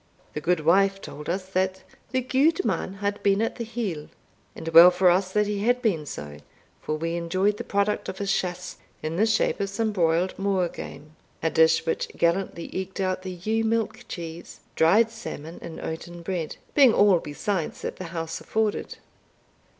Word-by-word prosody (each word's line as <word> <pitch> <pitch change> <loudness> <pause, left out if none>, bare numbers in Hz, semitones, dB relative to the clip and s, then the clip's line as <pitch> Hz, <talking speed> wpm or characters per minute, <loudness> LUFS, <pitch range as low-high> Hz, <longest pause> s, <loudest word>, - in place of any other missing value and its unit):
The 150 - -4
goodwife 180 +4 +3
told 150 -5 -8
us, 185 +2 -2
that 190 0 -1 0.3
"the 260 +2 0
gudeman 275 - +1
had 205 0 -1
been 200 0 +3
at 225 - -1
the 235 - -3
hill;" 215 -10 -4 0.5
and 160 - -8
well 165 +2 +10
for 180 0 +4
us 185 +1 +1
that 210 +1 +2
he 205 -1 -2
had 245 +4 +2
been 180 - 0
so, 75 - -7 0.4
for 155 - -2
we 165 +2 -2
enjoyed 185 +5 0
the - - -4
produce 200 +1 0
of 190 - -6
his 195 0 0
chasse 180 -1 -3 0.3
in 155 +2 -3
the 220 +4 +3
shape 220 -1 +1
of 200 -1 -1
some 220 +2 -1
broiled 175 -1 +1
moor 195 -2 +1
game, 155 -1 -10 0.3
a 160 - +1
dish 160 0 +4
which 165 - -1
gallantly 170 0 0
eked 190 +1 -4
out 185 -1 0
the 185 - -6
ewe 220 +6 -1
milk 225 0 -1
cheese, 170 -1 -8
dried 215 +8 +4
salmon, 165 -7 -8
and 165 -1 -8
oaten 170 +1 -6
bread, 170 -3 -3 0.2
being 270 -6 +6
all 200 -4 +5
besides 165 +3 -3
that - - -4
the 185 - -6
house 165 -1 -5
afforded. 220 -1 -1
185 Hz, 180 wpm, -25 LUFS, 165-205 Hz, 0.5 s, well